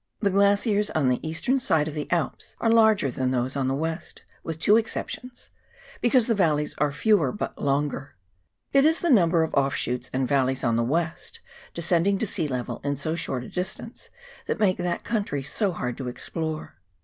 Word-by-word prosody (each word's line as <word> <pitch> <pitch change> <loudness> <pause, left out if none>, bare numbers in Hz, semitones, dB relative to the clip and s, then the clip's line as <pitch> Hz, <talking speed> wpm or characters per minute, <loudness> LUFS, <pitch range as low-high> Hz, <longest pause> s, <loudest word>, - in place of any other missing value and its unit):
the 200 -2 +1
glaciers 200 +2 +3
on 145 -5 +3
the 125 - +1
eastern 165 +12 0
side 160 -10 +2
of 155 - -5
the 150 -1 -5
Alps 170 -6 -2
are 225 - +2
larger 220 - +4
than 130 0 -1
those 130 +1 -1
on 135 -2 0
the 135 - 0
west 160 +3 -4
— - - -33
with 165 -1 -4
two 205 +6 +4
exceptions 240 +2 -3 0.2
— - - -22
because 245 -1 +4
the 230 - +2
valleys 155 -7 +1
are 150 -1 +2
fewer 210 +7 +2
but 210 - -4
longer. 140 -1 -1 0.6
It 275 0 +6
is 320 +2 +3
the 345 - +2
number 170 -7 +4
of 160 - -3
offshoots 125 -3 0
and 130 0 0
valleys 130 -1 +1
on 120 -3 +2
the 115 - +2
west, 165 +6 -2 0.4
descending 170 +3 +2
to 225 - -1
sea 165 -5 -1
level 125 -3 -4
in 145 0 -1
so 150 +3 -3
short 135 -6 -3
a - - -9
distance, 190 +6 -6 0.4
that - - -2
make 195 -4 +3
that 175 -1 -2
country 200 -12 -2
so 190 - 0
hard 125 -8 -4
to 130 - -5
explore. 155 - -5
160 Hz, 195 wpm, -25 LUFS, 135-205 Hz, 0.6 s, It